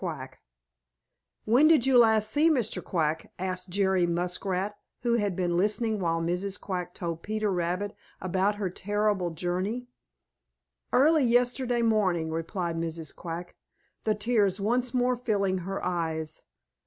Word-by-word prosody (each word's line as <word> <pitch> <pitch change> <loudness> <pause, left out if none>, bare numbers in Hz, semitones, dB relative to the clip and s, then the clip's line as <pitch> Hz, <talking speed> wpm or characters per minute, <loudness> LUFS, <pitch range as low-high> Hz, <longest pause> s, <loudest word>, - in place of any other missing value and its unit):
QUACK - - -6 1.1
"When 250 +8 +5
did 310 -6 +5
you 265 -1 +3
last 220 -2 +4
see 305 +3 +4
Mr. 255 -9 0
Quack?" 160 -2 -1
asked 185 0 -4
Jerry 190 -1 +2
Muskrat, 180 +3 -1 0.3
who 235 -1 +2
had 205 -4 0
been 175 -1 0
listening 215 +3 +1
while 165 -2 0
Mrs. 180 +4 -2
Quack 180 -2 -4
told 165 -1 -4
Peter 215 -1 -1
Rabbit 180 +3 -1 0.2
about 190 +3 0
her 200 -3 -3
terrible 205 -1 0
journey. 185 +8 -2 1.1
"Early 300 +3 +5
yesterday 245 0 +2
morning," 185 -8 +1
replied 165 +1 -3
Mrs. 165 -2 -4
Quack, 170 +1 -6 0.5
the 215 -1 +1
tears 205 -3 +1
once 240 +4 +1
more 250 0 +2
filling 200 -6 0
her 195 +2 -4
eyes. 160 -3 -2
195 Hz, 135 wpm, -28 LUFS, 175-225 Hz, 1.1 s, When